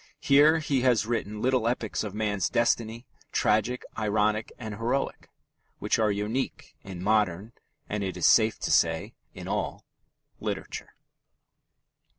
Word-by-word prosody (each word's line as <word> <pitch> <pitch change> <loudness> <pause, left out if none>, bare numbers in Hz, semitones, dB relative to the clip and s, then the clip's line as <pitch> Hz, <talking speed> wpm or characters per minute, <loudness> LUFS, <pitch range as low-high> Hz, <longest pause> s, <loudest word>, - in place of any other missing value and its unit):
Here 150 +3 +5
he 145 -4 0
has 125 -4 +3
written 105 -2 -3
little 130 -2 +2
epics 115 -3 -1
of 105 -2 -6
man's 105 -3 0
destiny, 115 0 0 0.3
tragic, 110 +4 +1
ironic, 110 0 0
and 110 -4 -6
heroic, 120 +6 -2 0.5
which - - 0
are 110 -1 +3
unique 105 +6 -3
in 90 -2 -8
modern 105 -1 +1 0.4
(and, 105 -1 -2
it 95 -2 -3
is 90 - 0
safe 110 -1 +5
to - - -1
say, 80 -1 +2 0.2
in - - -8
all) - - -3 0.5
literature. - - -5
110 Hz, 135 wpm, -27 LUFS, 105-120 Hz, 0.5 s, Here